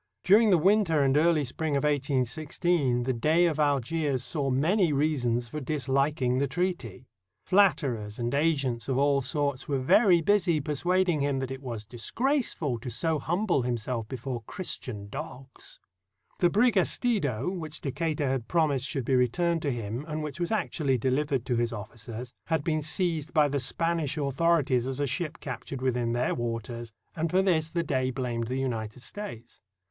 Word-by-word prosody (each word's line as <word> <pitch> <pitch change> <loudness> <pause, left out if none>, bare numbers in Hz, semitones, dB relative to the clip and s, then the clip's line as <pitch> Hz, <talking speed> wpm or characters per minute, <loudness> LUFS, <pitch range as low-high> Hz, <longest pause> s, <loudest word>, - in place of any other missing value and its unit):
During 210 +4 +6
the 185 - +6
winter 170 -4 +3
and 135 0 +2
early 155 0 +3
spring 145 +3 -1
of 140 - -1
1816 140 0 0
the 130 +1 0
Dey 155 +9 +3
of 155 -3 0
Algiers 145 -1 +1
saw 140 -2 -1
many 165 +7 +2
reasons 130 -5 0
for 150 +5 -5
disHking 135 -2 0
the 140 - +1
treaty. 140 - -3 0.4
Flatterers 140 - +2
and 120 +1 -2
agents 140 -6 0
of 130 - +1
all 140 0 +3
sorts 140 0 -2
were 140 - 0
very 175 - +5
busy 175 -2 +2
persuading 175 +4 +1
him 140 -1 0
that 130 -1 -3
it 135 0 -6
was 115 -5 -6
disgraceful 155 - -1
to 125 - -6
so 160 +4 0
humble 175 0 0
himself 120 -1 -2
before 125 0 -5
Christian 115 - -5
dogs. 135 +1 -9 0.6
The 175 - +4
brig 235 +5 +3
Estido, 180 - +1
which 155 -3 -5
Decatur 150 +1 -1
had 130 -3 -1
promised 150 -6 +1
should 135 -6 -3
be 135 - 0
returned 165 +7 +2
to 145 - 0
him, 115 +1 -4
and 155 0 -3
which 150 +2 -6
was 175 +2 -1
actually 150 - 0
delivered 135 +1 0
to 120 -3 0
his 120 0 0
officers, 115 +2 -7
had 160 -3 0
been 155 -1 0
seized 165 0 -2
by 150 -1 +5
the 140 0 -1
Spanish 165 +2 0
authorities 140 -3 +1
as 135 +1 -3
a 145 - +1
ship 155 +4 -3
captured 135 0 -6
within 120 -2 0
their 120 +1 0
waters, 115 -1 -4 0.2
and 165 +1 -1
for 185 +3 +3
this 160 -4 +1
the 170 +1 -1
Dey 130 -5 0
blamed 120 -3 -3
the 130 +2 -2
United 120 -3 -3
States. 200 - -8
140 Hz, 170 wpm, -28 LUFS, 125-165 Hz, 0.6 s, During